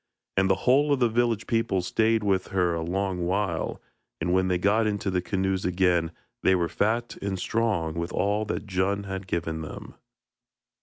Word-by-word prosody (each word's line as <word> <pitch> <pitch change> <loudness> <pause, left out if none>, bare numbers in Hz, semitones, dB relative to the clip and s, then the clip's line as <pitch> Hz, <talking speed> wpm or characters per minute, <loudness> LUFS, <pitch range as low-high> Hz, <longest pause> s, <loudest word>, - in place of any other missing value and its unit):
And 95 0 +3
the 95 - +4
whole 140 +4 +4
of 140 - +3
the 120 -2 +3
village 115 -1 +1
people 115 -5 0
stayed 110 +4 +2
with 95 -2 +1
her 90 -3 +1
a 85 - -2
long 95 +2 -1
while, 95 -3 -1 0.4
and 90 +2 0
when 95 0 +3
they 90 -1 +2
got 105 +4 +2
into 100 -2 -1
the 90 -1 +1
canoes 95 0 -1
again 90 -2 +2 0.3
they 95 - +4
were 85 -2 +1
fat 115 +7 -1
and 100 -1 -2
strong 95 -5 0
with 85 +1 -3
all 100 +3 +1
that 110 - -3
Djun 100 +1 0
had 95 -1 -5
given 80 -2 -2
them. 105 - -8
95 Hz, 185 wpm, -26 LUFS, 90-110 Hz, 0.4 s, the